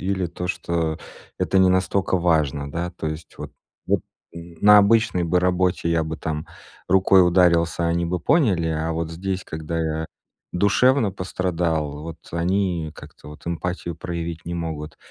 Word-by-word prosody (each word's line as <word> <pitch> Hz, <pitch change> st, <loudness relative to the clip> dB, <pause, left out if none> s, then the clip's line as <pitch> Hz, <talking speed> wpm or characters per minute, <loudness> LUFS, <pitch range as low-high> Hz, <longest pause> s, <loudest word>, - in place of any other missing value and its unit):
или 95 Hz, -1 st, -1 dB
то, 90 Hz, +1 st, -6 dB
что 85 Hz, -3 st, -1 dB, 0.4 s
это 95 Hz, -, +1 dB
не 95 Hz, 0 st, +6 dB
настолько 95 Hz, +1 st, +1 dB
важно, 75 Hz, -5 st, +1 dB
да, 85 Hz, +4 st, -3 dB
то 80 Hz, -, -3 dB
есть 80 Hz, +1 st, -8 dB
вот -, -, -7 dB, 0.4 s
вот -, -, +2 dB, 0.3 s
на 85 Hz, +5 st, +4 dB
обычной 105 Hz, -3 st, +3 dB
бы 90 Hz, +2 st, +2 dB
работе 90 Hz, -1 st, +1 dB
я 85 Hz, -1 st, +1 dB
бы 80 Hz, 0 st, -4 dB
там 80 Hz, -1 st, -4 dB, 0.4 s
рукой 95 Hz, 0 st, +5 dB
ударился, 85 Hz, -1 st, +3 dB
они 85 Hz, +1 st, 0 dB
бы 90 Hz, +1 st, -2 dB
поняли, 95 Hz, -, +2 dB
а 80 Hz, +1 st, -1 dB
вот 80 Hz, 0 st, -3 dB
здесь, 95 Hz, +3 st, -3 dB
когда 80 Hz, 0 st, -4 dB
я 80 Hz, 0 st, -2 dB, 0.5 s
душевно 105 Hz, +4 st, +3 dB
пострадал, 85 Hz, -5 st, -2 dB
вот, 80 Hz, 0 st, -7 dB
они 85 Hz, -2 st, -1 dB
как-то, -, -, -13 dB
вот, 75 Hz, +1 st, -13 dB
эмпатию 85 Hz, 0 st, -3 dB
проявить 85 Hz, 0 st, -5 dB
не 85 Hz, -, -4 dB
могут. 80 Hz, -3 st, -5 dB
85 Hz, 155 wpm, -23 LUFS, 80-90 Hz, 0.5 s, не